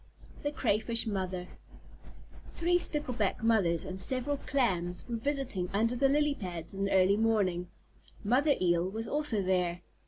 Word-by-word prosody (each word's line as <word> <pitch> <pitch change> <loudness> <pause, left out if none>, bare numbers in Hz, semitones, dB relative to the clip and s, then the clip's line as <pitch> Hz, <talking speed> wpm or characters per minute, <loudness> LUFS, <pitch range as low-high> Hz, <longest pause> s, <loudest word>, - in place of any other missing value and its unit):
THE 290 - -1
CRAYFISH 230 -3 0
MOTHER 185 -4 -3 1.1
Three 350 +1 +2
Stickleback 250 - -2
Mothers 195 -8 +2
and 185 0 -6
several 260 +8 +1
Clams 180 -12 -1
were 235 -1 -2
visiting 255 -8 -2
under 230 +4 +2
the 270 +2 +3
lily 295 +1 +3
pads 175 - -6
in 195 0 -2
the 195 - -2
early 190 +1 +4
morning. 200 -6 +1 0.6
Mother 270 +7 +3
Eel 175 0 +2
was 225 +3 -4
also 290 -9 0
there. 180 -2 0
215 Hz, 145 wpm, -31 LUFS, 185-265 Hz, 1.1 s, early